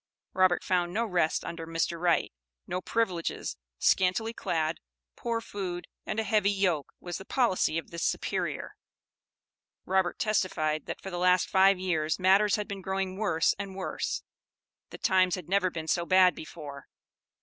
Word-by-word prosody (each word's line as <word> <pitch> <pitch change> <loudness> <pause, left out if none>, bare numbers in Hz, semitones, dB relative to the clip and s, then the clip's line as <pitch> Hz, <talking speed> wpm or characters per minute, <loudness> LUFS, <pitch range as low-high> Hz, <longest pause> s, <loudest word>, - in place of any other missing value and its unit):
Robert 185 -1 +3
found 175 -1 +1
no 230 +2 +1
rest 175 -6 +1
under 165 -1 -6
Mr. 165 +1 -1
Wright; 170 - +2 0.3
no 180 +1 -3
privileges, 185 -6 -1 0.2
scantily 190 - +2
clad, 160 -6 -1 0.4
poor 235 -1 -2
food, 185 -5 -5 0.2
and 215 - -1
a - - +1
heavy 215 -3 +2
yoke, 185 -7 0
was 175 -1 -5
the - - -8
policy 215 - +1
of 165 - -5
this 170 -1 -4
"superior." - - -2 1.1
Robert 190 -1 +1
testified, 180 -9 0
that - - -5
for 195 - -7
the 175 - -3
last 180 0 +4
five 195 0 +5
years, 160 -4 0
matters 195 +2 +4
had 210 -1 -3
been 200 -1 -6
growing 190 0 -2
worse 190 -6 +2
and 195 -2 -5
worse; 190 - -3 0.7
that - - -11
times 185 -2 +4
had 180 -4 -8
never 190 0 +2
been 160 -2 -6
so 170 +2 +1
bad 185 0 +5
before. 145 -3 -9
185 Hz, 160 wpm, -29 LUFS, 170-195 Hz, 1.1 s, five